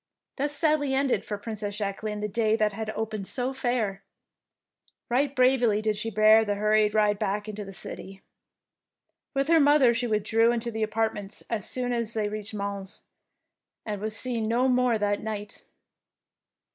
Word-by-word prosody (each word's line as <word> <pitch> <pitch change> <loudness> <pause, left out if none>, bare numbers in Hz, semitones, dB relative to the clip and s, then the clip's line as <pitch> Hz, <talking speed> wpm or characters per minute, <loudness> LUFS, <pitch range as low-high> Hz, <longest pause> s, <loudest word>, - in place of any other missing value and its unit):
Thus 290 +2 0
sadly 295 -3 +1
ended 270 -1 +1
for 205 - -4
Princess 205 -1 -5
Jacqueline 210 +1 -3
the 210 - -1
day 220 +1 +1
that 215 -2 +1
had 220 +1 -4
opened 215 -3 -4
so 255 0 -2
fair. 240 -7 -1 1.1
Eight 275 +2 +1
bravely 250 -4 +3
did 215 0 0
she 215 +2 -3
bear 215 +1 +5
the 205 -2 -1
hurried 210 +1 +2
ride 210 -1 +3
back 205 +2 -2
into 210 0 -5
the 195 - -9
city. 195 0 -8 1.1
With 275 0 +1
her 330 0 +5
mother 285 -4 +5
she 240 +1 -1
withdrew 220 +2 +2
into 235 0 -2
their 220 -1 -1
apartments 215 -2 -3
as 215 -4 -2
soon 250 -1 -2
as 235 -1 -2
they 210 -2 0
reached 215 0 -5
Mons, 200 -1 -5 0.8
and 210 -2 -4
was 215 +1 +1
seen 235 -4 -1
no 240 +3 +2
more 250 -2 +3
that 205 -1 0
night. 210 -1 -6
220 Hz, 165 wpm, -27 LUFS, 210-245 Hz, 1.1 s, bear